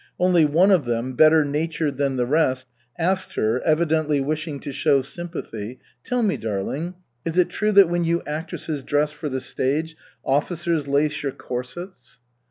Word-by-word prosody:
Only 180 Hz, -3 st, +4 dB
one 170 Hz, +7 st, +4 dB
of 175 Hz, -8 st, +4 dB
them, 120 Hz, +2 st, -2 dB
better 155 Hz, +3 st, +5 dB
natured 150 Hz, -1 st, -1 dB
than 140 Hz, -2 st, 0 dB
the 125 Hz, -, +1 dB
rest, 130 Hz, -2 st, +1 dB, 0.3 s
asked 185 Hz, +3 st, -1 dB
her, 110 Hz, +4 st, +1 dB
evidently 155 Hz, -2 st, +2 dB
wishing 155 Hz, +1 st, -2 dB
to 145 Hz, -, -5 dB
show 135 Hz, 0 st, +2 dB
sympathy: 130 Hz, -, -6 dB, 0.3 s
"Tell 250 Hz, -1 st, 0 dB
me, 205 Hz, -3 st, +1 dB
darling, 115 Hz, -, -3 dB, 0.3 s
is 165 Hz, +1 st, -3 dB
it 180 Hz, -, +4 dB
true 215 Hz, 0 st, 0 dB
that 200 Hz, -2 st, +8 dB
when 175 Hz, 0 st, 0 dB
you 170 Hz, +1 st, 0 dB
actresses 155 Hz, -1 st, -4 dB
dress 150 Hz, +2 st, +1 dB
for 150 Hz, 0 st, -5 dB
the 130 Hz, -1 st, -2 dB
stage, 150 Hz, +5 st, -1 dB, 0.3 s
officers 155 Hz, +2 st, 0 dB
lace 145 Hz, +1 st, +1 dB
your 140 Hz, -2 st, -2 dB
corsets?" 125 Hz, 0 st, -7 dB
150 Hz, 165 wpm, -23 LUFS, 135-170 Hz, 0.3 s, that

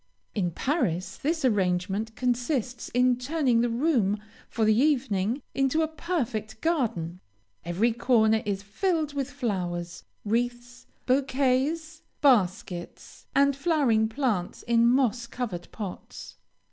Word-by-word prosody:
In 185 Hz, -4 st, 0 dB
Paris 190 Hz, -, -1 dB
this 315 Hz, 0 st, -1 dB
arrangement 200 Hz, 0 st, 0 dB
consists 245 Hz, 0 st, -1 dB
in 250 Hz, 0 st, +2 dB
turning 260 Hz, -3 st, +1 dB
the 240 Hz, -, +1 dB
room, 230 Hz, -5 st, +1 dB, 0.3 s
for 225 Hz, -, 0 dB
the 215 Hz, -, +5 dB
evening, 245 Hz, -3 st, +1 dB
into 275 Hz, +4 st, +2 dB
a -, -, +1 dB
perfect 250 Hz, -, -3 dB
garden. 215 Hz, -, -1 dB, 0.4 s
Every 195 Hz, +8 st, +1 dB
corner 220 Hz, -2 st, +3 dB
is 200 Hz, -3 st, -3 dB
filled 310 Hz, -, -1 dB
with 280 Hz, -1 st, -2 dB
flowers. 180 Hz, -10 st, -3 dB, 0.2 s
Wreaths, 240 Hz, +2 st, -2 dB, 0.2 s
bouquets, 275 Hz, +5 st, +1 dB, 0.2 s
baskets, 185 Hz, -9 st, 0 dB
and 280 Hz, 0 st, +4 dB
flowering 275 Hz, -8 st, +2 dB
plants 225 Hz, -8 st, -2 dB
in 235 Hz, 0 st, +3 dB
moss 240 Hz, -2 st, +2 dB
covered 210 Hz, -9 st, -5 dB
pots. 200 Hz, -4 st, -8 dB
240 Hz, 115 wpm, -27 LUFS, 205-275 Hz, 0.4 s, the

